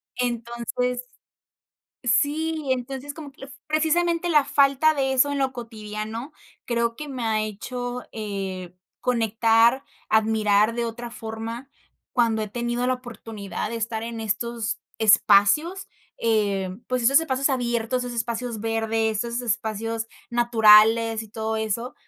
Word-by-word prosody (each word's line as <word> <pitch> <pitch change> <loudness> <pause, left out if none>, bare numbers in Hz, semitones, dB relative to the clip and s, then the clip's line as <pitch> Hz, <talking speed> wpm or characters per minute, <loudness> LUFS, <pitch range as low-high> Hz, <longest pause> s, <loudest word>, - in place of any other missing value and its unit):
Entonces 240 +1 -2 1.0
Sí, 300 +4 +1
entonces, 265 +3 -4
como 290 -2 -10
que - - -24
la 270 - -7
f 280 - -13
precisamente 335 +3 +1
la 300 -3 +5
falta 280 +3 +4
de 270 -2 0
eso 285 +2 +3
en 285 - -1
lo 265 -1 0
cotidiano 225 +1 -6 0.3
creo 235 -1 0
que 300 +4 -7
me 255 -4 -4
ha 220 -1 +1
hecho, 245 +4 -5
eh, 195 -4 -5 0.3
conectar, 230 +1 +3 0.3
admirar 215 0 +3
de 235 0 -1
otra 235 +1 -5
forma 225 +3 -6 0.4
cuando 230 -3 +2
he 215 - -3
tenido 240 +2 -2
la 255 - +2
oportunidad 225 -5 -6
de 230 - -3
estar 225 0 -3
en 230 -1 -5
estos 225 +1 -2 0.2
espacios, 220 - +4 0.3
eh, 205 -4 +1 0.2
pues, 255 -1 -1
esos 275 +5 +6
espacios 275 -3 0
abiertos, 245 -1 -1
esos 245 -1 -5
espacios 235 -1 -3
verdes, 225 -1 0
esos 235 +1 -3
espacios 225 -1 -2 0.2
naturales 225 -1 +5
y - - -15
todo 220 +1 -3
eso. 220 +3 -2
235 Hz, 135 wpm, -24 LUFS, 220-255 Hz, 1.0 s, esos